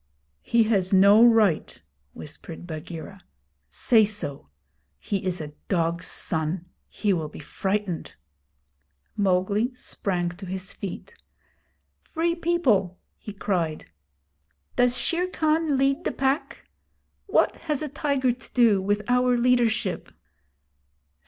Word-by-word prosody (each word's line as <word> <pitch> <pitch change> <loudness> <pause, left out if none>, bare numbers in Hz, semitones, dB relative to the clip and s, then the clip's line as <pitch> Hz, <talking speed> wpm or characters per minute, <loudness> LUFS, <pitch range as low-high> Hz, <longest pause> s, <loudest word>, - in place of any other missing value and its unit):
'He 235 - +3
has 200 -5 +1
no 200 +3 +7
right,' 220 -8 +3 0.3
whispered 160 +3 -9
Bagheera. 165 +3 -8 0.5
'Say 220 - +4
so. 145 - -3 0.5
He 195 - -3
is 185 -1 -1
a 150 -2 -7
dog's 170 -1 0
son. 165 +2 -1 0.2
He 205 -2 0
will 160 -4 -2
be - - -12
frightened.' 190 +3 -3 1.0
Mowgli 200 +5 +1
sprang 180 -7 -2
to 180 +2 -10
his 190 +1 -4
feet. 200 - -7 0.9
'Free 335 +1 -1
People,' 265 - +1 0.2
he 210 - -9
cried, 175 - -2 0.8
does 245 0 +3
Shere 350 +7 +1
Khan 315 -3 +1
lead 275 +4 +1
the - - -1
Pack? 270 +3 -2 0.6
What 395 - +2
has 305 -2 -2
a - - -2
tiger 280 -2 0
to 240 - -10
do 225 -6 +4
with 205 +2 0
our 250 0 +3
leadership?' 240 -2 +1
205 Hz, 115 wpm, -25 LUFS, 180-250 Hz, 1.0 s, no